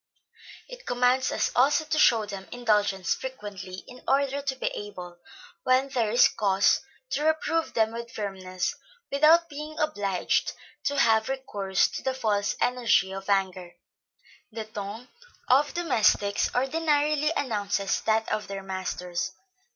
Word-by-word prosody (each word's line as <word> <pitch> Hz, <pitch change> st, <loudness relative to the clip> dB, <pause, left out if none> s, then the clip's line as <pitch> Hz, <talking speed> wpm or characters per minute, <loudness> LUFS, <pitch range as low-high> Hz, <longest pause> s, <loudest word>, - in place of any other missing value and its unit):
It -, -, -12 dB
commands 250 Hz, +1 st, +2 dB
us -, -, 0 dB
also 290 Hz, +5 st, +3 dB
to 310 Hz, 0 st, -1 dB
show 225 Hz, -7 st, +5 dB
them 195 Hz, -2 st, -8 dB
indulgence 210 Hz, -6 st, +1 dB
frequently, 200 Hz, -7 st, -7 dB
in 250 Hz, 0 st, -12 dB
order 275 Hz, +1 st, +1 dB
to 275 Hz, -1 st, -2 dB
be 260 Hz, -, -6 dB
able, 180 Hz, -4 st, -8 dB, 0.4 s
when 255 Hz, +2 st, +2 dB
there 240 Hz, -5 st, 0 dB
is 235 Hz, +3 st, +6 dB
cause, 200 Hz, -2 st, +2 dB, 0.3 s
to 295 Hz, -, -1 dB
reprove 315 Hz, +1 st, 0 dB
them 220 Hz, -1 st, +2 dB
with 235 Hz, 0 st, -6 dB
firmness, 185 Hz, -3 st, -3 dB, 0.4 s
without 315 Hz, +4 st, +5 dB
being 300 Hz, +1 st, -8 dB
obliged 205 Hz, -12 st, 0 dB, 0.3 s
to 285 Hz, -, 0 dB
have 225 Hz, -3 st, +3 dB
recourse 205 Hz, -8 st, 0 dB
to -, -, -6 dB
the 265 Hz, -1 st, -2 dB
false 210 Hz, -5 st, 0 dB
energy 230 Hz, -6 st, +2 dB
of 195 Hz, +1 st, -7 dB
anger. 185 Hz, -3 st, 0 dB, 0.8 s
The 220 Hz, 0 st, -5 dB
ton 215 Hz, +3 st, -7 dB, 0.4 s
of 280 Hz, +3 st, +4 dB
domestics 220 Hz, -11 st, +2 dB
ordinarily 300 Hz, +2 st, +1 dB
announces 205 Hz, -5 st, -1 dB
that 220 Hz, 0 st, +1 dB
of 215 Hz, -, -2 dB
their 195 Hz, -1 st, -6 dB
masters. 185 Hz, -1 st, -4 dB
225 Hz, 135 wpm, -27 LUFS, 200-275 Hz, 0.8 s, is